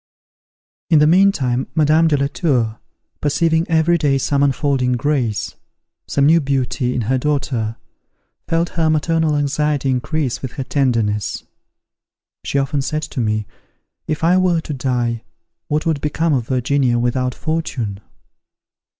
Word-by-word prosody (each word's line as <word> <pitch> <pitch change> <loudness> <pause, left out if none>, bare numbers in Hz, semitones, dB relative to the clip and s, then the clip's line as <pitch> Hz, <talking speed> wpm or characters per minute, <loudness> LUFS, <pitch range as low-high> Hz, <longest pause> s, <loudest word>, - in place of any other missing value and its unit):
In 160 - +5
the 150 - +5
meantime 150 -8 +3
Madame 155 +1 +4
de 150 -2 +2
la 140 - +1
Tour, 125 - 0 0.4
perceiving 160 +3 +1
every 165 +1 +3
day 140 -2 +2
some 140 +1 0
unfolding 135 -2 +1
grace, 125 -5 -1 0.5
some 140 - +1
new 165 +3 +5
beauty, 130 -2 -1
in - - 0
her 130 +4 0
daughter, 125 -6 -1 0.7
felt 165 +1 0
her 165 -2 0
maternal 155 0 +1
anxiety 145 -1 0
increase 130 +1 -2
with 130 -2 -6
her 135 - -4
tenderness. 115 -7 0 1.0
She - - -2
often 140 +1 0
said 155 +3 -2
to 145 - -5
me, 110 -2 0 0.6
"If 155 0 -3
I 180 +3 +4
were 175 -3 +2
to 155 - -6
die, 120 -3 -1 0.4
what 150 +1 -1
would 160 -4 0
become 160 +2 0
of 120 -4 -1
Virginia 130 -1 +1
without 125 +1 0
fortune?" 125 -11 -3
140 Hz, 140 wpm, -19 LUFS, 125-155 Hz, 1.0 s, In